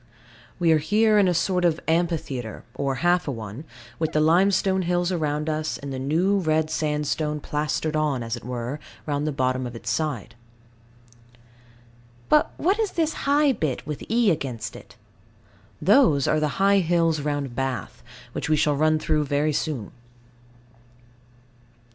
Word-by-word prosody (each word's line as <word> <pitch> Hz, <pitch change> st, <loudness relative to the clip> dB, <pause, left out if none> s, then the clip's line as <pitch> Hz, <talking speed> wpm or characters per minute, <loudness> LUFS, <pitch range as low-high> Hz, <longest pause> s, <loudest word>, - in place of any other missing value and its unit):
We 170 Hz, -2 st, +3 dB
are 155 Hz, -, +5 dB
here 210 Hz, +6 st, +3 dB
in 195 Hz, -, +4 dB
a 180 Hz, -, +2 dB
sort 180 Hz, +2 st, +1 dB
of 170 Hz, -2 st, +2 dB
amphitheatre, 160 Hz, -9 st, -1 dB
or 135 Hz, 0 st, -1 dB
half 175 Hz, 0 st, +3 dB
a -, -, 0 dB
one, 115 Hz, +4 st, -7 dB, 0.3 s
with 160 Hz, 0 st, -1 dB
the 155 Hz, -, +2 dB
limestone 190 Hz, +4 st, +3 dB
hills 175 Hz, 0 st, 0 dB
around 150 Hz, -3 st, -1 dB
us, 155 Hz, 0 st, -2 dB
and 140 Hz, -1 st, -7 dB
the 130 Hz, -, -4 dB
new 170 Hz, +9 st, +1 dB
red 155 Hz, -2 st, +1 dB
sandstone 150 Hz, 0 st, -1 dB
plastered 150 Hz, +1 st, -2 dB
on, 150 Hz, -5 st, 0 dB
as 115 Hz, +1 st, -3 dB
it 120 Hz, -, -10 dB
were, 125 Hz, +3 st, -4 dB, 0.3 s
round 145 Hz, 0 st, -1 dB
the -, -, 0 dB
bottom 130 Hz, -2 st, -1 dB
of 120 Hz, -, -9 dB
it 115 Hz, -, -9 dB
inside. 135 Hz, -8 st, -2 dB, 2.0 s
But 300 Hz, -, +4 dB
what 385 Hz, +6 st, +1 dB
is 435 Hz, -3 st, 0 dB
this 320 Hz, -2 st, 0 dB, 0.2 s
high 290 Hz, 0 st, +4 dB
bit 155 Hz, -, -2 dB
with 150 Hz, -1 st, -5 dB
E 230 Hz, -3 st, +3 dB
against 135 Hz, -8 st, -4 dB
it? -, -, -13 dB, 0.8 s
Those 165 Hz, -, +4 dB
are 155 Hz, -, +2 dB
the 150 Hz, -2 st, -1 dB
high 200 Hz, +1 st, +4 dB
hills 165 Hz, -3 st, +1 dB
round 145 Hz, -4 st, -3 dB
Bath, 135 Hz, -, -3 dB, 0.3 s
which -, -, -4 dB
we 155 Hz, -, +4 dB
shall 150 Hz, -1 st, +2 dB
run 155 Hz, +2 st, +3 dB
through 155 Hz, -1 st, 0 dB, 0.3 s
soon. 140 Hz, -8 st, -3 dB
155 Hz, 155 wpm, -24 LUFS, 140-175 Hz, 2.0 s, are